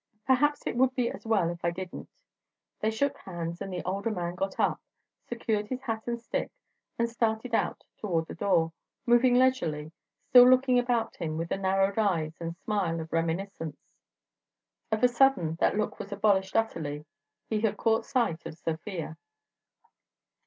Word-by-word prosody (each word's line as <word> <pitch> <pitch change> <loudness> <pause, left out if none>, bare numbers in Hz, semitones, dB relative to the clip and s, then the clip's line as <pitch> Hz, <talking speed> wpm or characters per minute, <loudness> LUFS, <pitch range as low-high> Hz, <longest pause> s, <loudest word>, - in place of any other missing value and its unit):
"Perhaps 290 +3 +2
it - - -2
would 260 0 +3
be 245 -2 +1
as - - -10
well 195 -7 +2
if 175 0 -9
I 170 - +3
didn't." 180 +1 -7 0.7
They 215 - +1
shook 280 +5 0
hands, 170 -2 -6
and 195 - -4
the 180 -1 -4
older 195 +4 -2
man 175 -5 -3
got 190 +2 -3
up, - - +1 0.5
secured 220 -3 -1
his 255 +2 -5
hat 225 -3 -3
and 235 0 -2
stick, 235 - -3 0.5
and 235 - +2
started 230 0 -1
out - - 0 0.2
toward 170 -6 0
the - - -8
door, 165 -5 +1 0.3
moving 245 +1 +5
leisurely, 170 -13 +2 0.3
still 250 0 +8
looking 255 -1 +5
about 240 -2 0
him 155 -1 -3
with 165 +1 -3
the - - -1
narrowed 195 +2 +1
eyes 165 -7 +1
and 165 0 -4
smile 190 -5 -1
of 160 0 -7
reminiscence. 165 -1 -3 1.0
Of 220 +1 0
a - - +9
sudden 245 -10 +3
that - - +2
look 215 - -2
was 200 - -7
abolished 195 -2 +1
utterly. 155 -9 -1 0.4
He 215 -1 -1
had 220 -2 +1
caught 225 0 +2
sight 235 - 0
of 155 - -9
Sofia. 165 0 -4
200 Hz, 165 wpm, -28 LUFS, 170-235 Hz, 1.0 s, a